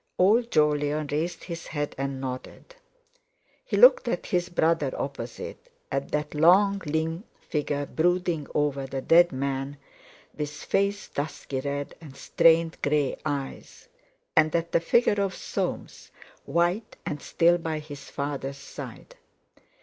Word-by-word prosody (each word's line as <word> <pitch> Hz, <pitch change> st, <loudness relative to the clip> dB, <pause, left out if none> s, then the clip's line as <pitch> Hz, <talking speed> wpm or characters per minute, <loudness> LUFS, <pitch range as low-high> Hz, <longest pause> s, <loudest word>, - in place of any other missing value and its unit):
Old 225 Hz, +6 st, +4 dB
Jolyon 150 Hz, -1 st, +2 dB
raised 165 Hz, +3 st, -2 dB
his 170 Hz, -2 st, -7 dB
head 145 Hz, -2 st, -3 dB
and 135 Hz, 0 st, -3 dB
nodded. 130 Hz, -, -7 dB, 0.9 s
He -, -, -2 dB
looked -, -, +7 dB
at -, -, -1 dB
his 180 Hz, -2 st, 0 dB
brother 165 Hz, -5 st, +1 dB
opposite, 125 Hz, -4 st, -6 dB, 0.2 s
at 135 Hz, 0 st, -2 dB
that 150 Hz, 0 st, -2 dB
long 195 Hz, +6 st, +5 dB
lean 160 Hz, +4 st, -1 dB, 0.2 s
figure 145 Hz, -1 st, -2 dB
brooding 175 Hz, -1 st, 0 dB
over 140 Hz, -2 st, 0 dB
the 135 Hz, 0 st, -4 dB
dead 175 Hz, +1 st, +6 dB
man, 135 Hz, +1 st, -3 dB, 0.6 s
with 150 Hz, -1 st, -3 dB
face 200 Hz, +6 st, -1 dB
dusky 145 Hz, -2 st, -4 dB
red, 140 Hz, +1 st, -3 dB
and 140 Hz, -4 st, -12 dB
strained 165 Hz, +3 st, +3 dB
grey 145 Hz, -2 st, +1 dB
eyes; 140 Hz, -2 st, -5 dB, 0.5 s
and 155 Hz, 0 st, +4 dB
at 170 Hz, 0 st, 0 dB
the -, -, +4 dB
figure 205 Hz, +4 st, +3 dB
of 195 Hz, -1 st, -1 dB
Soames -, -, -4 dB, 0.4 s
white 175 Hz, +6 st, 0 dB
and 150 Hz, -, -4 dB
still 170 Hz, +1 st, +3 dB
by 160 Hz, -2 st, -2 dB
his 145 Hz, -2 st, -9 dB
father's 140 Hz, -1 st, -4 dB
side. 320 Hz, -, -10 dB
155 Hz, 135 wpm, -26 LUFS, 140-175 Hz, 0.9 s, looked